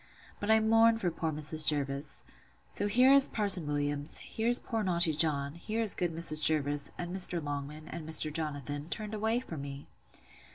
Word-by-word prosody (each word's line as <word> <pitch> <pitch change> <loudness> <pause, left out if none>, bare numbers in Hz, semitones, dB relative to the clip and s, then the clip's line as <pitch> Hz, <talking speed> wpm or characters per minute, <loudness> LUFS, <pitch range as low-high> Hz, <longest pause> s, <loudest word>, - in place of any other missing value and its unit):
But 205 - -5
I 220 0 +4
mourn 225 +1 +3
for 180 -6 -3
poor 165 -1 -4
Mrs. 155 +1 0
Jervis.—So 140 - -4
here 250 +5 +4
is 275 -1 +7
Parson 195 -7 +3
Williams; 145 0 -3
here's 235 +2 0
poor 225 -3 -5
naughty 170 -4 0
John; 145 -2 0
here 215 +7 -6
is 220 -3 +7
good 175 -2 -2
Mrs. 160 -2 0
Jervis, 145 -2 +1
and 175 +1 -6
Mr. 180 -2 +3
Longman, 145 +1 -7
and 160 -1 -9
Mr. 155 -1 +3
Jonathan, 145 -1 -5
turned 215 +1 -7
away 220 +2 -1
for 175 -10 -10
me! 140 0 -9
160 Hz, 170 wpm, -29 LUFS, 145-210 Hz, -, is